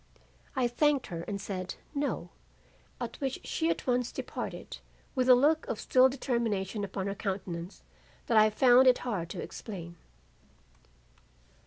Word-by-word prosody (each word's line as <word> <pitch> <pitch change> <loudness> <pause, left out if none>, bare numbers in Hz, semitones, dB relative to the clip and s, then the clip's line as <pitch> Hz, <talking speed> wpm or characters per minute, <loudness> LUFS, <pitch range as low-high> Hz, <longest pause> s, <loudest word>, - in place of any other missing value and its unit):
"I 255 -2 +2
thanked 285 +3 +2
her 165 - -3
and 200 -1 -3
said 190 -2 -4 0.2
'no,' 285 -1 -2 0.7
at - - -6
which 270 -1 -2
she 325 0 -1
at - - -1
once 250 -1 +1
departed - - -6 0.3
with 255 -2 +1
a 250 - +10
look 300 +5 +3
of 215 - -3
still 260 0 +5
determination 230 -6 -1
upon 195 -1 -3
her 200 - -1
countenance 190 -3 -5 0.4
that 230 - 0
I 215 0 +7
found 250 +3 +6
it 250 - +6
hard 190 -9 -2
to - - -5
explain. 170 -5 -8
235 Hz, 145 wpm, -30 LUFS, 195-260 Hz, 0.7 s, a